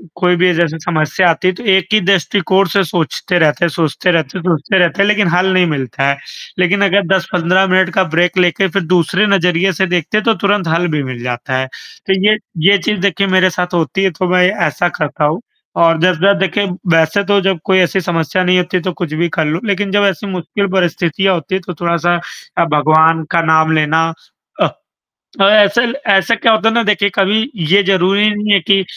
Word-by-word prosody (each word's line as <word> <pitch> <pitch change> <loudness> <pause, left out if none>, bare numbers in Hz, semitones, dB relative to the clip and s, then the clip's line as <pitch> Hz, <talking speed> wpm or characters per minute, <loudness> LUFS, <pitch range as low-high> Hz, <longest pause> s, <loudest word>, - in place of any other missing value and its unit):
कोई 180 -1 +1
भी 180 0 +2
जैसे 165 -1 -1
समस्या 160 +2 0
आती 170 +2 0
है 185 - +1
तो 185 - -11
एक 190 -1 +2
ही 215 - +5
दृष्टिकोण 195 +1 +1
से 200 - +2
सोचते 175 +2 -2
रहते 155 +1 +1
हैं - - 0
सोचते 165 +3 -1
रहते 160 -1 -2
हैं 180 - -7
सोचते 175 +1 0
रहते 175 +3 +1
हैं 200 - +3
लेकिन 210 -3 +2
हल 180 +2 +1
नहीं 185 -1 +3
मिलता 135 -3 -3
है। 140 - -1 0.4
लेकिन 185 +3 +1
अगर 200 +1 +2
10-15 190 0 +1
मिनट 185 -1 +2
का 190 - +3
ब्रेक 175 +1 +1
लेके 180 +2 +2
फ़िर 195 +1 -2
दूसरे 180 +3 +1
नज़रिए 185 -1 +1
से 190 +3 0
देखते 180 +3 -1
हैं 215 - -1
तो 225 - +3
तुरंत 200 -3 0
हल 170 +2 0
भी 150 -2 -2
मिल 130 -2 -7
जाता 125 +1 -3
है। 130 - -2
तो 190 +7 -6
ये 215 - +3 0.3
ये 200 - +5
चीज़ 210 +2 -2
देखिए 195 0 0
मेरे 185 0 +3
साथ 180 +1 -4
होती 175 +3 -1
है 190 - +1
तो 185 - 0
मैं 180 0 +3 0.2
ऐसा 175 - -1
करता 150 0 -2
हूँ 160 +8 -1 0.3
और 165 -1 +2
जब 185 0 +3
जब 200 +1 +3
देखिए 195 +2 0 0.3
वैसे 160 +5 +1
तो 200 0 +1
जब 190 -2 -1
कोई 190 -2 +2
ऐसी 185 +1 +1
समस्या 170 +1 -1
नहीं 180 0 +2
होती 180 +1 -1
तो 185 +1 -4
कुछ 155 -3 -5
भी 170 +2 -1
कर 160 - +1
लूँ। 155 +4 -2
लेकिन 200 -1 -2
जब 205 0 +2
ऐसी 195 +1 -2
मुश्किल 190 +2 -3
परिस्थितियाँ 185 +1 0
होती 180 +3 -3
है 190 - -3
तो 180 - -5
थोड़ा-सा 170 0 0 0.4
अ, - - +3
भगवान 160 +1 +2
का 170 - +2
नाम 160 0 +2
लेना। 155 +1 +1 0.5
अ, - - +3 0.7
ऐसे 205 +2 +4 0.3
ऐसे 195 +3 +3
क्या 225 +1 +2
होता 220 0 +1
है - - -3
ना 235 - +2
देखिए 205 -1 +1
कभी 205 +2 +1 0.3
ये 200 +1 +5
ज़रूरी 195 +2 +2
नहीं 210 0 0
है 200 - +4
कि 195 -1 +3
180 Hz, 215 wpm, -14 LUFS, 165-195 Hz, 0.7 s, ही